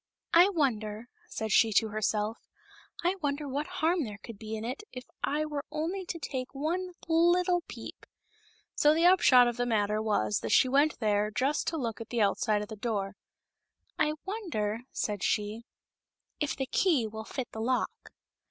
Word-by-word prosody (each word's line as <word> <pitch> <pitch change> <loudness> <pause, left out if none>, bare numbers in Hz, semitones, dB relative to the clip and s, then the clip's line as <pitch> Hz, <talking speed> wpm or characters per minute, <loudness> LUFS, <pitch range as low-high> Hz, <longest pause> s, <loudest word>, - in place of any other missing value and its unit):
" - - -62
I 350 +4 +7
wonder," 230 - -1 0.2
said 220 -1 -4
she 225 +2 +5
to 220 +2 +3
herself 215 +1 -1 0.2
— - - -24
" - - -15
I 370 +2 +2
wonder 285 0 -1
what 285 +3 -2
harm 350 -2 +1
there 210 -4 -6
could 215 0 -11
be 220 0 -5
in 220 +1 -5
it 255 - -4
if 250 0 -7 0.2
I 305 +1 +1
were 295 -2 -4
only 345 +5 -3
to 340 - -3
take 270 -4 -5
one 350 +6 -2
little 350 +2 +3
peep - - -9 0.4
?" - - -32 0.3
So 300 +1 +5
the 330 +2 +3
upshot 270 -9 +7
of 240 0 -2
the 245 0 0
matter 210 -2 +1
was 110 - +1
that 115 - -4
she - - +6
went 285 +4 +3
there 210 -2 +1
just 265 +7 0
to 325 - -1
look 230 -6 -3
at 225 - -8
the 240 - -1
outside 210 0 +2
of - - -8
the 220 - -6
door. 200 -3 -2 0.4
" - - -38
I 300 -1 +2
wonder," 315 - -2
said 205 -3 -2
she, 215 +3 -1 0.4
" - - -63 0.3
if 295 - -1
the 265 - -2
key 290 -3 +2
will 220 0 -6
fit 250 +2 -5
the 220 - -6
lock?" 250 +2 -2
250 Hz, 200 wpm, -29 LUFS, 215-310 Hz, 0.4 s, I